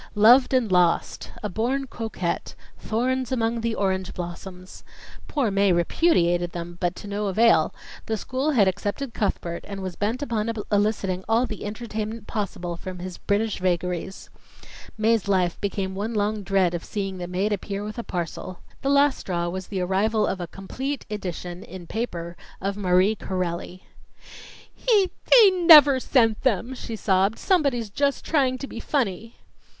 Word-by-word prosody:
"Loved 240 Hz, +5 st, +6 dB
and 250 Hz, -6 st, +2 dB
Lost," 180 Hz, -2 st, +1 dB
"A -, -, 0 dB
Born 245 Hz, +7 st, -1 dB
Coquette," 220 Hz, -8 st, -4 dB, 0.2 s
"Thorns 255 Hz, +3 st, -1 dB
among 230 Hz, -2 st, 0 dB
the 230 Hz, -1 st, -1 dB
Orange 190 Hz, -1 st, -1 dB
Blossoms." 180 Hz, +1 st, -8 dB, 0.4 s
Poor 265 Hz, -8 st, 0 dB
Mae 195 Hz, 0 st, +3 dB
repudiated 175 Hz, -, +2 dB
them, 175 Hz, 0 st, -7 dB
but 175 Hz, 0 st, 0 dB
to -, -, -9 dB
no 205 Hz, +1 st, -2 dB
avail; 225 Hz, +4 st, +4 dB, 0.4 s
the 220 Hz, -1 st, -1 dB
school 260 Hz, +7 st, -2 dB
had 225 Hz, -10 st, +4 dB
accepted 210 Hz, +7 st, -2 dB
Cuthbert 170 Hz, -4 st, -2 dB
and 195 Hz, -1 st, -6 dB
was 185 Hz, -2 st, -5 dB
bent 225 Hz, +7 st, -1 dB
upon 230 Hz, -4 st, -1 dB, 0.2 s
eliciting 205 Hz, -3 st, 0 dB
all 230 Hz, +3 st, +3 dB
the 215 Hz, -3 st, -6 dB
entertainment 220 Hz, 0 st, -5 dB
possible 180 Hz, -6 st, -4 dB
from 185 Hz, +1 st, -7 dB
his 180 Hz, 0 st, -7 dB
British 210 Hz, +1 st, 0 dB
vagaries. 180 Hz, +1 st, -2 dB, 0.7 s
Mae's 220 Hz, -1 st, +2 dB
life 185 Hz, -3 st, +1 dB
became 195 Hz, -1 st, -2 dB
one 210 Hz, +4 st, -3 dB
long 210 Hz, +1 st, 0 dB
dread 190 Hz, -2 st, +1 dB
of 170 Hz, -, -3 dB
seeing 195 Hz, -3 st, -4 dB
the 175 Hz, -, -4 dB
maid 190 Hz, +4 st, 0 dB
appear 200 Hz, 0 st, -4 dB
with 215 Hz, +3 st, -6 dB
a -, -, -3 dB
parcel. 180 Hz, 0 st, -5 dB, 0.2 s
The 270 Hz, -, -1 dB
last 280 Hz, 0 st, +4 dB
straw 175 Hz, -2 st, -2 dB
was 185 Hz, +1 st, -5 dB
the 190 Hz, -3 st, -3 dB
arrival 210 Hz, +4 st, +1 dB
of 185 Hz, -, -2 dB
a 175 Hz, -, -4 dB
complete 260 Hz, +10 st, -5 dB
edition 180 Hz, -3 st, -5 dB
in 180 Hz, -1 st, -10 dB
paper 170 Hz, -5 st, -4 dB, 0.2 s
of 195 Hz, +1 st, -2 dB
Marie 185 Hz, +1 st, +3 dB
Corelli. 185 Hz, -2 st, -4 dB, 0.9 s
"He 415 Hz, -6 st, +2 dB, 0.2 s
he 450 Hz, -6 st, +9 dB
never 310 Hz, -7 st, +8 dB
sent 225 Hz, -4 st, +2 dB
them!" 245 Hz, 0 st, 0 dB
she 235 Hz, -3 st, -6 dB
sobbed. 195 Hz, 0 st, +1 dB
"Somebody's 275 Hz, -, +1 dB
just 280 Hz, +5 st, 0 dB
trying 265 Hz, -5 st, +2 dB
to 275 Hz, -, -5 dB
be 235 Hz, -, -8 dB
funny." 230 Hz, -5 st, -2 dB
205 Hz, 160 wpm, -24 LUFS, 185-235 Hz, 0.9 s, he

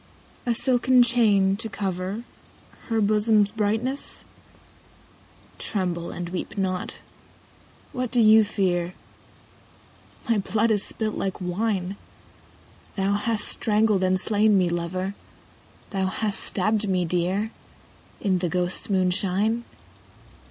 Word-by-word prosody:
A 235 Hz, -, +2 dB
silken 250 Hz, +1 st, +4 dB
chain, 210 Hz, -5 st, +3 dB
to 225 Hz, +1 st, -4 dB
cover 195 Hz, +2 st, -3 dB, 0.7 s
Her 225 Hz, -1 st, +1 dB
bosom's 210 Hz, 0 st, +3 dB
brightness? 225 Hz, +6 st, -1 dB, 1.3 s
(Tremble 180 Hz, -5 st, -2 dB
and 175 Hz, -1 st, -5 dB
weep 180 Hz, +3 st, -5 dB
not: 185 Hz, -2 st, -2 dB, 1.0 s
what 250 Hz, -1 st, -2 dB
dost 235 Hz, -2 st, +3 dB
thou 220 Hz, +1 st, +8 dB
fear 180 Hz, -4 st, -1 dB, 0.5 s
?) -, -, -29 dB
— -, -, -26 dB
My 230 Hz, -3 st, +2 dB
blood 220 Hz, +3 st, +1 dB
is 205 Hz, -2 st, +2 dB
spUt 215 Hz, -1 st, -2 dB
like 190 Hz, -2 st, -3 dB
wine, 190 Hz, +1 st, -2 dB, 1.0 s
Thou 195 Hz, 0 st, +1 dB
hast 210 Hz, +1 st, 0 dB
strangled 215 Hz, -2 st, +3 dB
and 185 Hz, 0 st, +2 dB
slain 210 Hz, 0 st, +3 dB
me, 180 Hz, -2 st, +2 dB
lover. 180 Hz, +3 st, -3 dB, 0.8 s
Thou 190 Hz, -3 st, 0 dB
hast 210 Hz, +2 st, -1 dB
stabbed 210 Hz, +1 st, +1 dB
me 180 Hz, -2 st, +1 dB
dear. 180 Hz, +6 st, -1 dB, 0.7 s
In 190 Hz, -3 st, +1 dB
the 175 Hz, -1 st, -1 dB
ghosts' 180 Hz, +3 st, -1 dB
moonshine. 195 Hz, +4 st, 0 dB
200 Hz, 115 wpm, -24 LUFS, 185-220 Hz, 1.3 s, thou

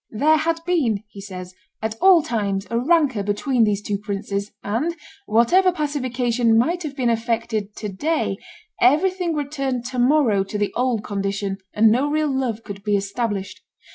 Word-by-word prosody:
"There 300 Hz, +8 st, +3 dB
had 330 Hz, +1 st, -1 dB
been," 250 Hz, -, +1 dB
he 200 Hz, -, -10 dB
says, 185 Hz, -2 st, -8 dB, 0.3 s
"at 220 Hz, 0 st, -2 dB
all 370 Hz, -4 st, +6 dB
times 200 Hz, -5 st, -2 dB
a 230 Hz, -, +1 dB
rancor 285 Hz, -5 st, +2 dB
between 220 Hz, +4 st, +1 dB
these 205 Hz, -1 st, -1 dB
two 205 Hz, -1 st, -2 dB
princes, 200 Hz, 0 st, -4 dB
and, 255 Hz, +12 st, -1 dB, 0.3 s
whatever 295 Hz, -, +4 dB
pacification 250 Hz, -7 st, 0 dB
might 335 Hz, +10 st, +1 dB
have 300 Hz, -4 st, -5 dB
been 250 Hz, -4 st, +1 dB
effected 225 Hz, -2 st, -2 dB
to 210 Hz, -, -5 dB
day, 305 Hz, -, -1 dB, 0.4 s
everything 340 Hz, +6 st, +3 dB
returned 275 Hz, -4 st, -2 dB
to 255 Hz, 0 st, -4 dB
morrow 245 Hz, -6 st, +3 dB
to 195 Hz, +2 st, -5 dB
the 205 Hz, -1 st, -1 dB
old 245 Hz, -3 st, 0 dB
condition, 195 Hz, -1 st, -3 dB
and 215 Hz, +1 st, +4 dB
no 265 Hz, +6 st, +2 dB
real 300 Hz, -2 st, 0 dB
love 235 Hz, -4 st, -2 dB
could 200 Hz, -1 st, -8 dB
be 205 Hz, -1 st, +2 dB
established. 200 Hz, 0 st, -3 dB
235 Hz, 165 wpm, -22 LUFS, 205-290 Hz, 0.4 s, all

